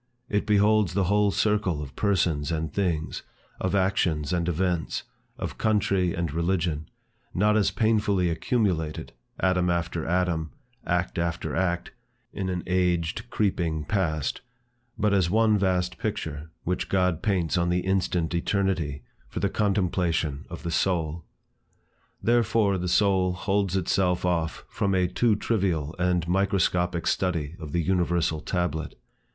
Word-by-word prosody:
It 105 -1 0
beholds 105 -3 +3
the 100 - +3
whole 100 +3 +3
circle 100 -5 +1
of 70 -2 -7
persons 85 -7 +1
and 80 -2 -2
things, 85 -6 -1 0.4
of 95 +2 0
actions 90 -6 +1
and 85 -1 0
events, 90 0 -1 0.3
of - - -5
country 100 -4 +1
and 85 -4 -2
religion, 85 -2 -1 0.5
not 105 +3 +3
as 105 -2 +3
painfully 105 -4 +2
accumulated, 85 -5 -1 0.3
atom 90 -1 +2
after 85 -1 -1
atom, 85 -2 0 0.3
act 90 0 0
after 85 0 -2
act, 90 -1 -1 0.4
in 95 -1 -3
an 90 -1 -2
aged 90 +4 0
creeping 85 -8 0
Past, 80 -6 -1 0.6
but 105 -1 +2
as 95 -4 +3
one 110 +2 +4
vast 90 -2 0
picture, 80 -8 -4
which 90 +1 -2
God 90 -4 +1
paints 95 -6 +1
on 85 -1 +1
the 90 +1 +1
instant 90 -3 0
eternity, 85 - 0 0.2
for - - -5
the - - +1
contemplation 90 -7 0
of - - -8
the 85 - -3
soul. 85 -3 0 1.0
Therefore 115 -4 +2
the 90 - -2
soul 95 -1 +3
holds 95 0 0
itself 90 0 +1
off 85 -3 -1
from 100 -1 0
a 90 -1 +3
too 115 +4 +2
trivial 90 -9 -1
and 90 -2 +1
microscopic 90 -2 +1
study 85 -4 0
of 75 -2 -7
the 85 +2 0
universal 85 -3 +1
tablet. 80 -2 -2
90 Hz, 135 wpm, -26 LUFS, 85-100 Hz, 1.0 s, one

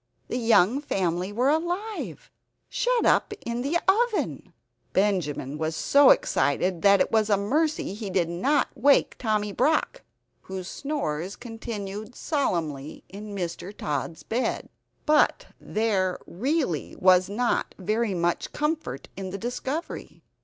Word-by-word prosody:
The - - -1
young 230 +2 +4
family 185 - -1
were 250 +6 +2
alive; 355 +7 -3 0.4
shut - - +1
up - - +3
in 235 +1 -2
the 285 +7 +1 0.3
oven! 435 - -3 0.4
Benjamin 155 -8 0
was 160 0 -1
so 280 - +5
excited 170 +5 +2
that 200 +1 +6
it - - +1
was 220 -1 +2
a 205 - +4
mercy 295 +5 0
he 210 -1 -5
did 180 -3 +1
not 255 - +1
awake 280 +4 +4
Tommy 210 -3 0
Brock, 305 +9 +1 0.4
whose 190 -1 -6
snores 195 - -3
continued 220 -1 -7
solemnly 160 - -2
in 205 +2 -8
Mr. 180 +2 -5
Tod's 150 +2 -3
bed. 240 +3 -2 0.4
But 300 -1 +3
there 200 -4 0
really 250 - -1
was 185 0 +5
not 235 +4 0
very 215 +1 0
much 175 0 -1
comfort 300 - -2
in 190 -1 -5
the 195 - -5
discovery. 260 - -5
210 Hz, 130 wpm, -26 LUFS, 180-270 Hz, 0.4 s, that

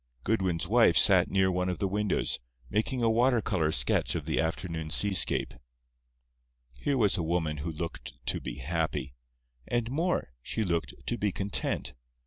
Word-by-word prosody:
Goodwin's 95 -5 0
wife - - +5
sat - - +6
near 95 -1 +2
one 90 0 0
of 90 - -2
the 100 - 0
windows, 105 +1 0 0.3
making 120 +3 0
a 115 - +4
water 120 +2 +3
color 90 -8 0
sketch 60 -4 +1
of - - -3
the - - -1
afternoon 80 -1 -2
seascape. 95 +4 +1 1.3
Here 140 -2 0
was 105 -5 +3
a - - 0
woman 80 -2 -1
who 80 +4 -4
looked 85 +2 -6
to - - 0
be - - -5
happy. 75 -2 -2 0.5
And 120 0 -1
more—she 120 - -2
looked 85 -4 -1
to 120 - -2
be 105 -1 +1
content. 100 +2 -1
95 Hz, 155 wpm, -29 LUFS, 80-110 Hz, 1.3 s, sat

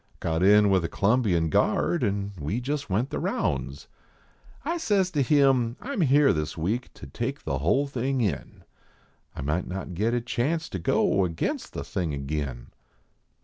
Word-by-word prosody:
Got 80 0 -1
in 105 +1 +6
with 95 -3 +3
a - - 0
C - - -13
lumbian 100 -7 +2
guard 170 - +2
and 100 -3 -1
we 75 +11 -2
jist 140 +1 -3
went 110 +8 0
the - - -2
rounds. 70 +1 -2 0.8
I 335 +3 0
says 200 - +1
to 150 -5 +1
him, 135 -3 +3
"I 280 - -6
m 210 - -1
here 145 -1 +5
this 75 +1 -3
week 105 +10 -2
to - - -10
take - - -4
the 70 - -2
hull 105 - +2
tiling 135 0 -1
in; 100 - -3 0.7
I - - -5
might 75 +6 -1
not 95 0 -5
git 110 +7 0
a - - +2
chance 145 +7 -1
to 95 - -4
go 95 +3 +2
against 85 -3 -3
the - - -4
thing 85 -6 -3
agin. 70 -3 -4
105 Hz, 180 wpm, -26 LUFS, 85-135 Hz, 0.8 s, in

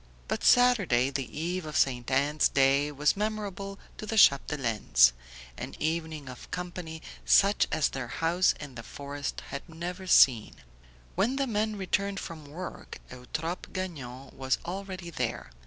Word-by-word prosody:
But - - -2
Saturday, 200 - +4
the 135 -2 -3
eve 175 +3 -2
of 155 -1 -3
Ste. 125 -3 +1
Anne's 145 +3 +2
day, 140 +2 +3
was 150 +1 +2
memorable 200 -2 -3 0.2
to 215 - -6
the 225 - -2
Chapdelaines; 115 - +4 0.5
an - - -6
evening 160 -2 -2
of 125 -1 -10
company 175 -3 -6 0.2
such 200 +1 +4
as 155 -2 +2
their 130 -2 -5
house 170 +7 +2
in 145 -3 -8
the 120 - -7
forest 140 +4 -6
had 140 +5 -7
never 175 +3 -6
seen. 120 -10 +5 0.6
When 245 +6 +1
the 275 0 +1
men 215 -2 -1
returned 200 0 -1
from 160 -3 -8
work 175 +5 -8
Eutrope 155 +8 -5
Gagnon 140 -9 -6
was 130 -1 0
already 185 -1 -6
there. 65 - -3
160 Hz, 145 wpm, -29 LUFS, 135-190 Hz, 0.6 s, seen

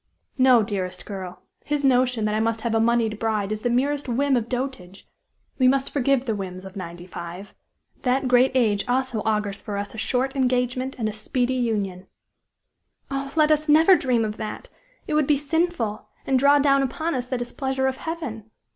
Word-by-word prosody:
No, 255 -3 +6
dearest 185 -4 -4
girl 190 -3 -7 0.2
his 290 -1 -1
notion 250 -3 +3
that 210 - 0
I 215 - +1
must 225 0 0
have 235 -1 -1
a 225 - +3
moneyed 225 -2 +1
bride 215 -3 -1
is 215 0 -3
the 245 - 0
merest 275 +3 0
whim 270 +3 +2
of 235 -1 -1
dotage; 245 -8 -5 0.5
we 255 - +5
must 270 +1 +2
forgive 275 -1 +1
the 225 - 0
whims 190 -2 -6
of 190 +1 -10
ninety 175 -2 -7
five. 180 +2 -8 0.5
That 260 +1 +1
great 250 +1 +4
age 215 -5 +2
also 255 -3 0
augurs 210 -2 -1
for 205 -3 -5
us 200 0 -4
a 220 - -7
short 265 +4 -1
engagement 255 0 0
and 225 -3 -1
a 215 - -3
speedy 245 +4 -1
union!" 205 -7 -2 1.0
"Oh! 275 0 -3
never - - +3
let 305 0 +5
us 310 +4 +5
dream 240 -4 +1
of 215 0 -4
that! 215 - -6 0.4
It - - -3
would 300 -2 +2
be 295 - +4
sinful, 295 -7 -1 0.2
and 265 -1 +2
draw 280 +2 +5
down 275 -1 +4
upon 315 +5 -2
us 250 -2 -2
the 255 - -2
displeasure 265 +2 -2
of 265 0 0
Heaven. 265 -11 -6
245 Hz, 190 wpm, -24 LUFS, 215-270 Hz, 1.0 s, No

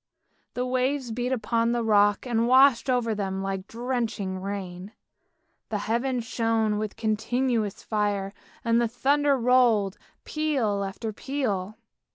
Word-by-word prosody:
The 250 - -1
waves 255 0 0
beat 245 +3 -2
upon 235 -1 +1
the 240 -1 0
rock, 205 -1 +3
and 235 -2 +1
washed 260 0 +5
over 245 -3 +1
them 195 -2 -3
like 195 0 -4
drenching 230 -6 -3
rain. 190 0 -6 0.8
The 215 - -1
heaven 240 +5 -1
shone 225 -2 0
with 215 -1 -4
continuous 225 0 -1
fire, 205 -2 -1 0.3
and 230 0 +3
the 235 - +2
thunder 280 +4 +2
rolled, 235 -5 +3 0.2
peal 270 -10 -1
upon 195 +3 -5
peal. 215 -6 -3
230 Hz, 130 wpm, -26 LUFS, 205-250 Hz, 0.8 s, washed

